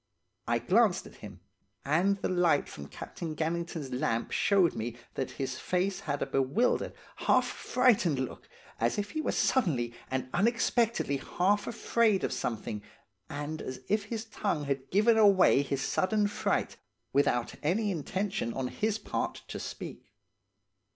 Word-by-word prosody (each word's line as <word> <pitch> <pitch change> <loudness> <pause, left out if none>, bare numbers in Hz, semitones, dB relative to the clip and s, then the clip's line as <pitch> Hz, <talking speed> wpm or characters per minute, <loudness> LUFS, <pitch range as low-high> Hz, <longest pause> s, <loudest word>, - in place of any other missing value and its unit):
"I - - +2
glanced - - +3
at - - -13
him, - - -11 0.4
and 175 +8 +2
the - - +2
light 175 -5 +2
from 70 -1 -9
Captain 160 - -6
Gannington's 165 -3 -2
lamp 115 -2 -1
showed 195 -4 +3
me 115 +1 -4 0.2
that 130 - -2
his 130 -1 -3
face 185 +2 0
had 145 -2 -2
a - - -1
bewildered, 135 - +1 0.2
half 255 -1 +3
frightened 245 - +2
look, 130 -1 -5 0.3
as 115 +1 +1
if 205 0 -2
he 310 - -2
were - - 0
suddenly 135 - +1 0.2
and 130 -1 -2
unexpectedly 230 - +2
half 200 +8 0
afraid 230 -3 +2
of - - 0
something, 110 -2 -3 0.5
and 145 +2 -4
as 130 - -6
if 210 0 +1
his 220 +1 -4
tongue 200 -8 -2
had 135 -1 -3
given 220 +5 +4
away 195 -9 +6
his 140 -1 -2
sudden 210 +3 +1
fright, 205 - -1 0.4
without 120 -3 +2
any 200 +7 +1
intention 185 - -2
on 130 -1 -2
his 215 0 -1
part 215 - -3
to - - -5
speak. - - -8
175 Hz, 150 wpm, -30 LUFS, 135-210 Hz, 0.5 s, away